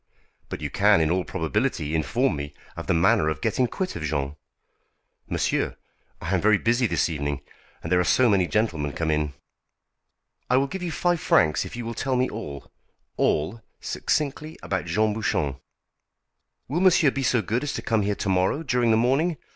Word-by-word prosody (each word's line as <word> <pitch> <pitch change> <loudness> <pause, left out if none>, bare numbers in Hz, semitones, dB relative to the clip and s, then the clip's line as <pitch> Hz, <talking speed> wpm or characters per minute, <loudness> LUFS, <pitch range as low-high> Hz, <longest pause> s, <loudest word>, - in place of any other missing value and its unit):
"But - - -6
you - - -4
can - - +4
in 80 0 +2
all 90 +1 +1
probability 80 - -1
inform 80 -1 +1
me 70 0 -6 0.2
of - - -7
the - - +2
manner 80 -2 +3
of 80 -4 -3
getting 125 - +1
quit 185 +8 -4
of - - -5
Jean." 70 -1 -2 0.9
"Monsieur! - - -1 0.4
I 90 - -3
am 95 - +2
very 110 0 +4
busy 120 +4 +2
this - - +1
evening, 75 -4 -3 0.4
there 90 +2 +2
are - - +3
so 125 +7 +4
many 95 -5 +3
gentlemen 85 -10 -1
come 80 -1 -1
in." 75 -2 -1 1.1
"I 125 - +4
will 135 - +3
give 185 +7 -6
you 175 -2 -3
five 175 +1 +1
francs 75 - +3
if - - -8
you 120 -1 -5
will 115 - -4
tell 130 +3 -1
me 125 +1 +2
all 70 -11 -7 0.4
all 95 +10 0 0.2
succinctly 155 +1 -2
about 95 -2 -2
Jean 105 +5 +1
Bouchon." 75 -10 -1 1.1
"Will 160 +6 -1
monsieur 180 -6 +5
be 140 - -3
so 125 -3 +2
good 115 +7 -1
as 145 - -3
to - - -4
come 110 -2 +1
here 100 0 0
to - - -4
morrow 95 - +1
during 125 -5 +1
the 110 - +4
morning? 140 +8 +2
105 Hz, 185 wpm, -25 LUFS, 80-130 Hz, 1.1 s, monsieur